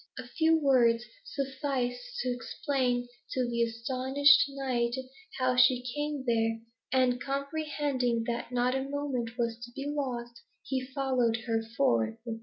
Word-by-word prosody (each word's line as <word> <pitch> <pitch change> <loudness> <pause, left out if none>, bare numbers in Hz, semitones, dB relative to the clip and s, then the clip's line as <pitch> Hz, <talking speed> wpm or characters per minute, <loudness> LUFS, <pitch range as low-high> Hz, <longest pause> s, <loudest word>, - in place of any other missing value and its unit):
A 255 -2 -6
few 320 +5 +3
words 245 -6 +4 0.2
sufficed 275 - -3
to - - -1
explain 245 0 -1 0.3
to 255 -1 0
the 235 0 -1
astonished 260 +4 +4
knight 255 -3 -1 0.4
how 255 -1 +2
she 250 0 +5
came 295 -2 -2
there, 225 -2 +1 0.3
and 250 -1 +2
comprehending 280 -4 -1
that 235 +1 -3
not 250 +1 +1
a 265 - 0
moment 260 -5 -3
was 230 -1 -1
to 240 - -7
be 275 - -4
lost, 245 -5 -3 0.2
he 265 -1 -1
followed 255 -4 +1
her 225 -2 +1 0.2
forth. 110 -4 +2
255 Hz, 135 wpm, -30 LUFS, 235-275 Hz, 0.4 s, she